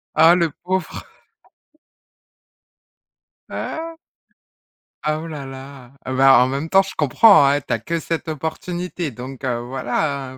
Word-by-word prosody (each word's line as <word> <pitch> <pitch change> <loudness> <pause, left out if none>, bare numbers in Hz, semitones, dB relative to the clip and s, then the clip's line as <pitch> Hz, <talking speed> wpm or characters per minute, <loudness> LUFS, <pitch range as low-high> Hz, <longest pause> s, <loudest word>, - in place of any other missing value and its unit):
Oh, 165 +3 +6
le 170 -2 +1
pauvre! 185 +1 -3 2.4
Ah! 330 +1 -5 1.1
Ah, 155 0 0
oh 165 - -7
là 150 -4 -7
là! 135 -1 -11
Heu, 130 - -2
bah, 135 -1 +6
en - - +1
même 140 +5 -3
temps, 195 0 +5
je 195 - -8
comprends, 160 - +5
hein, 145 +1 +2
tu 125 - -4
as 115 - -1
que 165 +9 -3
cette 165 0 -4
opportunité, 170 +2 -4
donc 130 +2 -9
heu, 125 -2 -1
voilà 130 +2 -3
hein, - - -13
145 Hz, 145 wpm, -20 LUFS, 130-170 Hz, 2.4 s, Oh